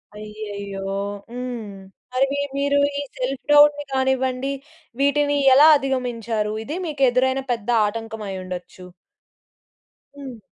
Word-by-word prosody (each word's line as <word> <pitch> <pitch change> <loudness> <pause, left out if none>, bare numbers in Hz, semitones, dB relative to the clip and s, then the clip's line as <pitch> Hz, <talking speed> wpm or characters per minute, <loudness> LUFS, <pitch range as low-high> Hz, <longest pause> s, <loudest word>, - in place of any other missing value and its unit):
అయ్యయ్యో! 205 -2 -7 0.5
హ్మ్. 245 -4 -5 0.4
మరి 255 +1 +3
మీ 285 - -1 0.2
మీరు 285 0 +1 0.2
ఈ - - -1 0.2
సెల్ఫ్ 255 0 -3
డౌట్‌ని 295 0 +6
కానివ్వండి 265 0 0 0.5
వీటిని 285 +1 +2 0.2
ఎలా 290 +4 +8
అధిగమించారు? 235 -5 -2
ఇది 295 +9 -5
మీకు 295 -4 -2
ఎదురైన 260 +2 +1
పెద్ద 230 -2 -3 0.2
ఆటంకం 225 +1 -6
అయి 190 -1 -5
ఉండొచ్చు. 180 0 -8 1.3
హ్మ్. 270 -4 -8
255 Hz, 115 wpm, -22 LUFS, 215-275 Hz, 1.3 s, ఎలా